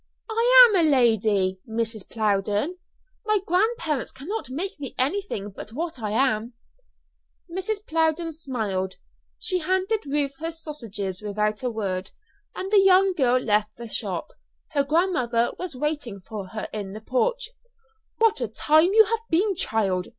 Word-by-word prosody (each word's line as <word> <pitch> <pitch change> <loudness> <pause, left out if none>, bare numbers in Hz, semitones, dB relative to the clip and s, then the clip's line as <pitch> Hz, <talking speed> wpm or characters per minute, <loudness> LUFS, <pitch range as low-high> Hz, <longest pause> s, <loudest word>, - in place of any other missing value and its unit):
"I - - +8
am 410 -5 +2
a 315 - +4
lady, 215 -7 +2
Mrs. 225 -2 -3
Plowden. 210 - 0 0.4
My 430 0 +2
grandparents 360 - 0
cannot 345 +11 -5
make 330 +7 -4
me 275 -3 -6
anything 265 - -1
but 210 +3 -10
what 320 0 -4
I 215 -2 -3
am." 230 0 +1 0.9
Mrs. 390 +4 -4
Plowden 325 +1 0
smiled. 210 - -3 0.4
She 365 -2 0
handed 375 +3 0
Ruth 280 -1 -1
her 325 +1 -3
sausages 230 - -5
without 210 0 -1
a 250 - -1
word, 190 -4 -3 0.5
and 380 +1 -5
the 410 -2 +6
young 385 0 +5
girl 255 -6 +3
left 215 -2 0
the 235 0 -7
shop. - - -3 0.4
Her 285 -3 +1
grandmother 275 -7 +1
was 360 -6 -5
waiting 285 -7 -3
for 195 +1 -7
her 215 +3 -5
in 200 -3 -5
the 215 - -8
porch. 470 - -1 0.7
"What 450 -1 +3
a - - 0
time 315 +5 +3
you 440 0 +8
have 450 +2 -1
been, 390 +5 +2
child!" 205 - 0
275 Hz, 150 wpm, -25 LUFS, -, 0.9 s, I